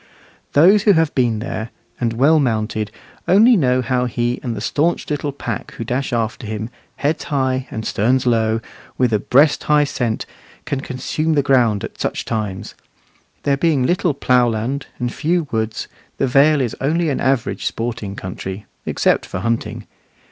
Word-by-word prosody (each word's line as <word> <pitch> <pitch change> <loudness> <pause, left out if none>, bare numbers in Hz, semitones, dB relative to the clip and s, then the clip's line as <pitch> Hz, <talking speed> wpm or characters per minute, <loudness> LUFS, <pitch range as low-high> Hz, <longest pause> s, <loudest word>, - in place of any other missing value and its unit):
Those 185 +8 +6
who 205 0 +5
have 160 -3 +2
been 120 -4 +1
there, 110 0 -4 0.3
and 115 -2 0
well 145 +7 +4
mounted, 110 -4 -1 0.4
only 225 +6 +6
know 130 - +2
how 125 0 0
he 120 0 -1
and 120 -3 -3
the - - -4
stanch 165 +4 0
little 145 0 -1
pack 120 -5 -5
who - - -5
dash 125 +4 -2
after 115 -1 -2
him 110 +2 -4 0.2
heads 150 +3 -1
high 130 -3 0
and 110 0 -5
sterns 125 +5 +1
low, 115 -2 +2 0.4
with 125 -3 +2
a 105 - +3
breast 140 +8 +3
high 150 0 +4
scent 120 -6 -2 0.4
can 135 -1 -2
consume 150 +5 -2
the 145 -2 +2
ground 120 -7 +3
at - - -7
such - - -2
times. 105 -4 -3 0.7
There 140 -1 +2
being 145 -4 +2
little 175 -1 +1
ploughland, 125 0 +1
and 120 -1 -3
few 165 0 0
woods, 110 -1 -2 0.3
the - - +1
Vale 140 +3 +4
is 120 -4 -2
only 160 +4 +1
an - - -1
average 130 -2 0
sporting 115 -4 -4
country, 95 +2 -6 0.2
except - - +1
for 90 - -5
hunting. 115 +2 -2
125 Hz, 165 wpm, -19 LUFS, 115-145 Hz, 0.7 s, Those